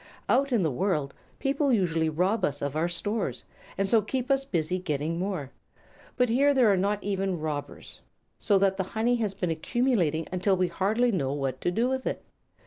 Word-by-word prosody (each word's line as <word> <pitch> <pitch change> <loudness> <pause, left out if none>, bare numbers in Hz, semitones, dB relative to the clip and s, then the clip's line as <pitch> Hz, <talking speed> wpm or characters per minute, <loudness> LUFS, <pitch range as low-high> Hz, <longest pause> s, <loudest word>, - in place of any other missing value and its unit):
"Out 275 +2 +2
in 230 -6 +2
the 160 - +1
world 150 -2 -1 0.2
people 280 0 +1
usually 165 -7 +1
rob 185 +7 0
us 145 -3 -1
of 140 0 -2
our 160 +2 +1
stores, 175 - -2 0.3
and 195 0 +1
so 225 +1 +4
keep 255 +5 -2
us 270 0 +2
busy 180 - -1
getting 160 -1 -2
more. 180 -8 -3 0.7
But 250 -1 +3
here 280 +5 +3
there 245 -5 +5
are - - +3
not 200 +2 0
even 195 -3 -1
robbers, 145 -2 -6 0.4
so 205 - +3
that 195 0 +2
the 190 - 0
honey 240 +2 +2
has 210 -4 -2
been 180 -3 -1
accumulating 170 - 0
until 185 +1 +1
we 180 -1 +1
hardly 215 +8 +1
know 140 -9 -1
what 135 -2 -3
to - - +1
do 225 +7 +1
with 260 0 -2
it. - - -3
190 Hz, 195 wpm, -27 LUFS, 160-230 Hz, 0.7 s, there